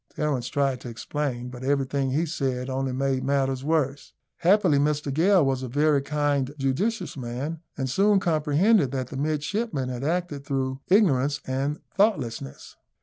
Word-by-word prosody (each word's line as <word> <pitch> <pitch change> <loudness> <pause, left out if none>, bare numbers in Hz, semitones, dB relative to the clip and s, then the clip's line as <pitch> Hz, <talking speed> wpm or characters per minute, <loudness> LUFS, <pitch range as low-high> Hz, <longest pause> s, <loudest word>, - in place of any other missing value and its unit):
Terence 140 -5 -1
tried 135 -2 0
to 125 - -7
explain, 125 +1 -3
but 125 0 -9
everything 135 0 0
he 150 +6 +1
said 130 -5 -2
only 135 0 -1
made 135 0 0
matters 135 -1 0
worse. 145 -2 -1 0.2
Happily, 180 -5 +4
Mr 145 -1 0
Gale 175 +2 +4
was 135 -1 0
a 130 - -4
very 145 +3 +2
kind, 145 -1 -1
judicious 150 - -1
man, 135 +5 -4 0.2
and 130 - -1
soon 195 +9 +3
comprehended 160 - +3
that 130 -2 -3
the - - -7
midshipmen 150 - -1
had 125 0 -5
acted 160 -2 -2
through 135 -1 -2
ignorance 145 - +3
and 135 +3 -2
thoughtlessness. 135 - -1
140 Hz, 150 wpm, -25 LUFS, 130-155 Hz, 0.2 s, Happily